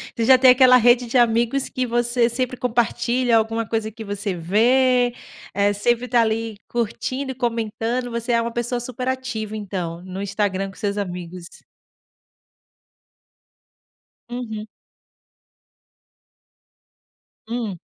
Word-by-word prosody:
Você 230 - 0
já 260 +2 +7
tem 255 0 +7
aquela 255 0 +7
rede 245 0 +4
de 250 - +1
amigos 240 +3 +2
que 255 -1 -2
você 240 0 +1
sempre 255 +2 -2
compartilha 240 0 +1
alguma 225 0 -1
coisa 220 -1 -2
que 225 +1 -9
você 200 -2 -4
vê, 245 +7 +3 0.4
eh, 205 +1 +2
sempre 240 +4 0
está 240 -1 +3
ali 225 -1 -1
curtindo 255 +4 -3
e - - -8
comentando, 235 0 -2
você 235 +1 -2
é 230 - +3
uma 235 0 -3
pessoa 240 +1 -2
super 250 +1 -5
ativa 255 -5 -3
então, 180 -5 -5
no 185 +1 -6
Instagram 195 -1 -1
com 195 - -14
seus 205 -2 -2
amigos. 180 -2 -5 2.8
Uhum. 220 -3 -5 2.8
Hum. 225 -5 -4
230 Hz, 125 wpm, -22 LUFS, 210-245 Hz, 2.8 s, já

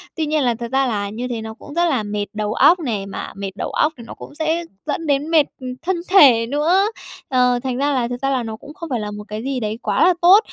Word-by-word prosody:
Tuy 320 - -1
nhiên 305 -1 +1
là 240 -2 +2
thật 235 +1 -6
ra 270 0 +2
là 205 -3 -2
như 235 +5 -4
thế 235 -3 -4
nó 220 0 -6
cũng 290 - -11
rất 345 +1 +2
là 265 -10 +1
mệt 205 0 -3
đầu 210 0 -2
óc 350 +9 +5
này, 225 - -2
mà 195 - -6
mệt 195 -1 -5
đầu - - -3
óc 305 +1 +1
thì 235 - -10
nó - - -8
cũng 290 - -12
sẽ 320 +2 0 0.2
dẫn 310 +2 -3
đến 285 +2 +1
mệt, 310 -3 +5 0.2
ừm, 255 - -5
thân 370 +1 0
thể 260 -12 +6
nữa, 320 - +2 0.4
ờ, 250 -1 +3
thành 255 -2 -2
ra 285 +2 +1
là 250 -3 0
thực 245 0 -5
ra 270 - +1
là 260 -3 0
nó 220 -1 -5
cũng 285 +6 -12
không 335 -2 -8
phải 245 -4 -1
là 210 0 -4
một 210 0 -7
cái 215 +2 -5
gì 270 0 -2
đấy 215 -1 -3
quá - - +1
là 365 - +5
tốt. 365 +4 +8
255 Hz, 285 wpm, -20 LUFS, 225-310 Hz, 0.4 s, tốt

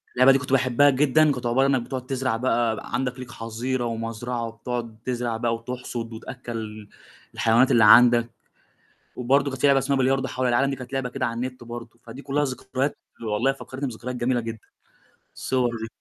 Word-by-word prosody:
اللعبة 130 +2 +7
دي 135 - +5
كنت 130 -1 -6
باحبها 130 +2 +4
جدًا، 150 +3 +4
كانت 125 -3 -4
عبارة 130 +3 +3
إنك 135 -2 +2
بتقعد 130 +1 -5
تزرع 130 -3 -1
بقى 115 -2 +1 0.2
عندك، 125 0 -1
ليك 125 -1 -8
حظيرة، 120 +3 -3
ومزرعة، 115 +1 -3
وبتقعد 115 0 -5
تزرع 120 -2 -2
بقى، 115 0 0
وتحصد، 120 -1 -6
وتأكَّل 110 -3 -7 0.4
الحيوانات 115 +3 +3
اللي 115 - +5
عندك، 120 +1 +7 0.9
وبرضه 135 +3 +2
كانت 130 - -6
في - - +5
لعبة 140 -1 +5
اسمها 135 +1 0
بلياردو 135 +1 +1
حول 130 0 -1
العالم، 125 +3 +2
دي 135 - -2
كانت 125 0 -10
لعبة 135 -2 -1
كده 130 +1 -2
على 115 - -2
النت 125 +1 -5
برضه، 120 0 -9
فدي 135 - -10
كلّها 145 +1 0
ذكريات 130 +1 -2 0.2
والله 115 +4 +1
فكرتني 135 0 -6
بذكريات 125 +1 -6
جميلة 125 0 0
جدًا، 115 -1 -6 0.8
الصور 130 -2 0
دي. 115 - -4
125 Hz, 180 wpm, -24 LUFS, 115-130 Hz, 0.9 s, اللعبة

